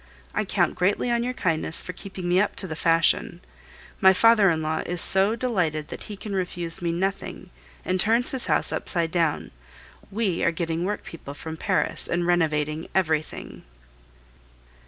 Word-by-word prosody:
I - - -1
count - - 0
greatly 200 +6 0
on 235 0 +1
your 250 +1 -3
kindness 165 -4 +1
for 180 - -7
keeping 185 0 -8
me 180 +2 +3
up 210 - -1
to - - -1
the 160 -4 -6
fashion. 165 0 +1 0.6
My 190 0 +6
father 215 +1 +5
in 160 -2 -1
law 155 +1 -2
is 175 0 -2
so 195 +5 +7
delighted 175 -11 -2
that - - -8
he 205 - -7
can 205 +1 -7
refuse 175 -2 -2
me 170 -1 -1
nothing, 185 0 -4 0.3
and 185 0 -1
turns 230 +5 +3
his 265 -2 -4
house - - +2
upside 170 -3 -1
down. 165 -3 -1 0.6
We 200 -4 -2
are - - +3
getting 165 0 -3
workpeople 165 -7 -6
from 160 +2 -7
Paris - - -1
and 175 0 -1
renovating 155 -2 0
everything. 160 -5 -2
175 Hz, 165 wpm, -24 LUFS, 165-195 Hz, 0.6 s, so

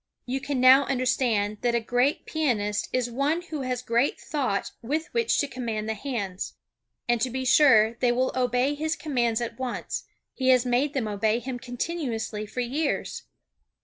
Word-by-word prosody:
You 260 +2 -2
can 275 -1 -2
now 260 +2 +7
understand 245 -5 0
that 240 -1 +1
a - - +3
great 245 +5 0
pianist 215 -10 -1
is 245 -1 -1
one 290 +7 0
who 310 -4 -5
has 255 -2 -3
great 235 +4 +1
thought 260 -10 -2
with 300 +7 -2
which 465 -1 +2
to 285 - +1
command 225 -5 -4
the 220 - 0
hands. 205 -6 -4 0.5
And 240 -1 +1
to 255 - +1
be 260 +1 -3
sure 240 -5 +6
they 245 -2 +3
will 255 +2 +1
obey 250 +2 +1
his 315 +2 -2
commands 240 -7 0
at 235 +2 -5
once, 255 -2 -4 0.3
he 260 -1 0
has 255 -1 +5
made 255 +4 +1
them 245 -5 0
obey 215 +2 +1
him 250 0 -5
continuously 245 -5 -3
for 250 - -3
years. 280 +5 -2
250 Hz, 175 wpm, -26 LUFS, 230-275 Hz, 0.5 s, now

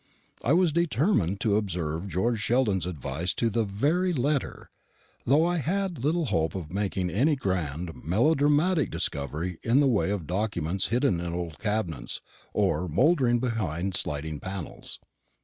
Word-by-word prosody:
I 130 - +3
was 175 -1 +4
determined 145 - +1
to 105 -2 +2
observe 85 -4 -2
George 110 +6 0
Sheldon's 105 -4 +1
advice 80 +1 -2
to 115 -1 +1
the 115 +2 +1
very 150 - +1
letter, 140 0 -1 0.6
though 145 +6 +5
I 175 0 +1
had 175 -2 -2
little 160 +3 +1
hope 80 - 0
of 85 -3 -6
making 95 -2 -1
any 145 - +3
grand 90 - -2
melodramatic 145 - +3
discovery 80 +5 -3
in 120 +4 +3
the 145 - +4
way 115 -7 +2
of 100 -5 -2
documents 95 -1 -1
hidden 120 -6 +1
in 85 -1 -4
old 85 -4 -5
cabinets, 95 - -2 0.3
or 90 - +1
mouldering 125 - +3
behind 100 - -2
sliding 75 -2 -1
panels. 95 -1 -7
105 Hz, 145 wpm, -27 LUFS, 85-140 Hz, 0.6 s, though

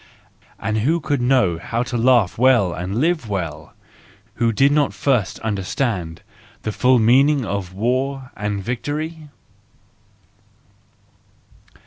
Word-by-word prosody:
And 110 0 -2
who 155 +10 +1
could 145 -4 -1
know 120 -10 +2
how 115 +7 -2
to 125 0 -6
laugh 120 -5 +3
well 125 -8 +4
and 90 +4 -4
live 155 -2 0
well, 80 -6 -5 0.7
who 115 -1 +3
did 135 +6 +3
not 145 -1 +1
first 115 -7 0
understand 100 -4 -3 0.4
the 110 - -2
full 125 +4 +3
meaning 130 +4 +4
of 100 -3 -4
war 130 +6 -2
and 105 -1 -3
victory 150 - -4
120 Hz, 115 wpm, -20 LUFS, 100-135 Hz, 0.7 s, well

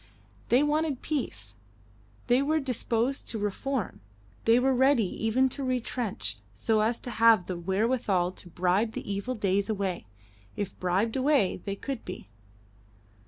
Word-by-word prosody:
They 250 +4 +5
wanted 295 -2 0
peace; 105 - -3 0.7
they 245 +2 +3
were 310 +3 +2
disposed 250 -1 -1
to 230 - -3
reform; 210 +3 -3 0.4
they 230 +2 +6
were 265 +1 +3
ready 260 -1 +4 0.2
even 250 +4 +3
to 275 +2 -5
retrench, 240 - -2 0.2
so 215 - +1
as 225 +2 +1
to 245 - -6
have 225 -5 +5
the 185 - -4
wherewithal 190 0 +1
to 180 - -11
bribe 185 +6 +1
the - - -6
evil 200 +6 -2
days 200 -1 0
away, 195 - -2 0.5
if 200 -2 -5
bribed 190 +5 0
away 265 -7 +2
they 200 -1 -2
could 270 +3 -5
be. - - -8
225 Hz, 145 wpm, -28 LUFS, 195-260 Hz, 0.7 s, they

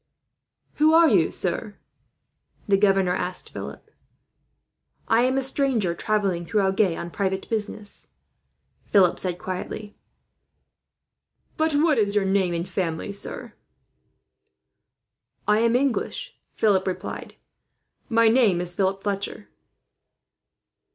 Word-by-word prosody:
"Who 310 +1 +4
are 335 0 +7
you, - - +3
sir?" - - -3 0.9
the 200 - +4
governor 195 -2 +3
asked 180 0 -1
Philip. - - -9 1.2
"I 225 +1 +4
am 260 +2 +2
a 270 - +2
stranger, 260 -9 +1
travelling 195 -2 -1
through 205 +5 0
Agen 190 -3 +1
on 170 - -6
private 190 0 -2
business," 210 -1 -1 0.7
Philip 185 -4 +3
said 180 -2 -2
quietly. 190 +3 -6 1.6
"But 315 0 +1
what 295 -2 +3
is 205 -1 +1
your 205 -2 +2
name 190 -2 +1
and 170 +2 -3
family, 180 -1 -3
sir?" 200 - -6 1.9
"I 210 +1 +4
am 230 +1 +2
English," 265 -1 -1 0.2
Philip 195 -4 +2
replied. 185 - -5 0.7
"My 230 -1 +4
name 220 -6 +4
is 175 0 -3
Philip 195 0 0
Fletcher." 200 +1 -3
200 Hz, 110 wpm, -24 LUFS, 185-230 Hz, 1.9 s, are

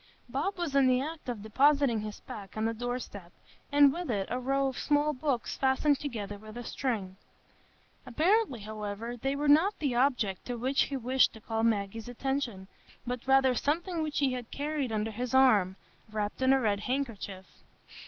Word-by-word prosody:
Bob 290 +11 -2
was 335 -6 -3
in 275 -2 +5
the 255 0 +4
act 305 0 -5
of 225 -4 -4
depositing 275 +1 +3
his 210 0 -7
pack 200 -1 -9
on 215 - 0
the 225 - 0
door 245 +2 -2
step, 200 -8 -9 0.4
and 285 -1 +6
with 350 -1 -5
it 200 -4 -1
a 250 - -1
row 275 +2 +1
of 265 - -4
small 295 0 +2
books 260 -3 -2
fastened 270 +2 +2
together 210 -7 -5
with 215 +3 -9
string. 210 -9 -3 0.9
Apparently, 320 - +2
however, 215 +2 -5
they 270 +4 -2
were 290 +1 -1
not 320 +8 +5
the 280 -5 -1
object 240 -6 +1
to 245 -1 -4
which 260 +4 +2
he 275 - -3
wished 260 +1 +3
to 220 - -11
call 225 0 -3
Maggie's 220 0 0
attention, 245 -6 -3 0.4
but 245 0 -4
rather 265 -1 +5
something 330 - -1
which 305 -1 -3
he 275 -3 +2
had 245 -2 -5
carried 290 -3 -2
under 220 0 -1
his 245 +4 -3
arm, 210 -8 +5 0.4
wrapped 210 +2 -3
in 260 0 +4
a 270 - +5
red 210 -5 +1
handkerchief. 210 -6 -3
250 Hz, 185 wpm, -30 LUFS, 220-280 Hz, 0.9 s, and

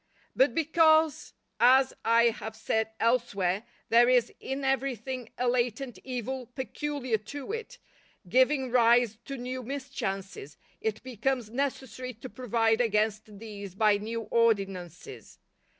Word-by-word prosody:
But - - +3
because, 320 -1 +3 0.2
as 260 +2 +5
I 235 +1 +5
have 220 0 -7
said 220 0 -1
elsewhere, 215 -4 +1 0.2
there 240 +1 +6
is 245 -2 +3
in 270 +1 -4
everything 260 -2 -2
a 250 - 0
latent 245 +1 -1
evil 255 0 -4
peculiar 260 -3 -2
to 280 - -7
it, 460 +2 -6 0.5
giving 260 +4 +2
rise 235 -2 +4
to 275 - -5
new 255 +1 -5
mischances, 195 - -5 0.2
it 220 -1 -2
becomes 250 -2 -2
necessary 255 -1 -3
to 245 +4 -9
provide 230 -2 +1
against 215 -2 0
these 200 -3 -9
by 210 0 +4
new 225 +3 -4
ordinances. 195 - -1
240 Hz, 120 wpm, -28 LUFS, 220-265 Hz, 0.5 s, there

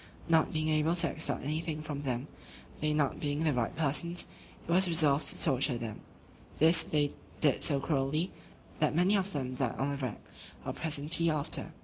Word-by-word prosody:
Not 160 -1 +3
being 155 0 -1
able 155 +2 +2
to 170 -1 +4
extort 160 - 0
anything 155 +1 -3
from 145 -2 -5
them, 130 -1 -3 0.5
they 155 0 0
not 150 -2 0
being 145 +1 -2
the 155 -2 +2
right 120 -2 -1
persons, 165 +3 -1 0.4
it - - -3
was 185 +2 +4
resolved 155 -4 +3
to - - +1
torture 135 -3 +2
them: 115 -3 -6 0.6
this 165 +2 +5
they 145 -2 0 0.3
did 145 -4 +2
so 140 -3 +2
cruelly, 150 +4 -1 0.5
that 150 -1 +1
many 180 +5 +3
of 195 0 -1
them 130 -3 -3
died 130 -2 -2
on 140 +1 -1
the 140 - -3
rack, 130 -6 -5 0.4
or - - -3
presently 160 +2 +3
after. 150 -2 -2
150 Hz, 185 wpm, -31 LUFS, 140-165 Hz, 0.6 s, this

